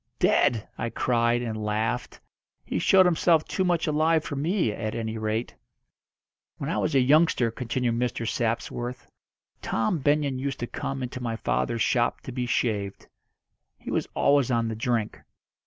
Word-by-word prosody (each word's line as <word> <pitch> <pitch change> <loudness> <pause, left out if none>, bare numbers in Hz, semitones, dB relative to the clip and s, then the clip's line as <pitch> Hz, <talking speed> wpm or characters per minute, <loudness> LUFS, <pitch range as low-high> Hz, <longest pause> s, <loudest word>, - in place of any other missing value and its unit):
"Dead!" 115 -3 +2
I 115 - -1
cried, 120 0 +1
and 110 -2 -4
laughed. 110 +4 -2 0.5
"He - - -2
showed 190 -1 +5
himself 165 -2 +3
too 190 - -1
much 175 -3 +1
alive 155 +1 +2
for 145 - -5
me, 160 - 0
at 110 +1 -4
any 110 -1 -3
rate." 110 +2 -2 1.0
"When - - -3
I - - 0
was 150 - 0
a - - +6
youngster," 130 -3 +4
continued 120 +1 -1
Mr. 115 -1 -1
Sapsworth, 120 +2 -2 0.5
"Tom 115 +9 0
Benyon 145 -1 +1
used 135 0 -3
to - - 0
come 135 +2 -4
into 125 0 -5
my 115 -2 -2
father's 115 0 0
shop 120 -1 +1
to - - -8
be 125 0 -3
shaved. 105 -5 -1 0.7
He - - -8
was - - 0
always 140 -2 +3
on 115 -2 +1
the 110 - -3
drink. 115 -2 -1
125 Hz, 160 wpm, -26 LUFS, 115-145 Hz, 1.0 s, a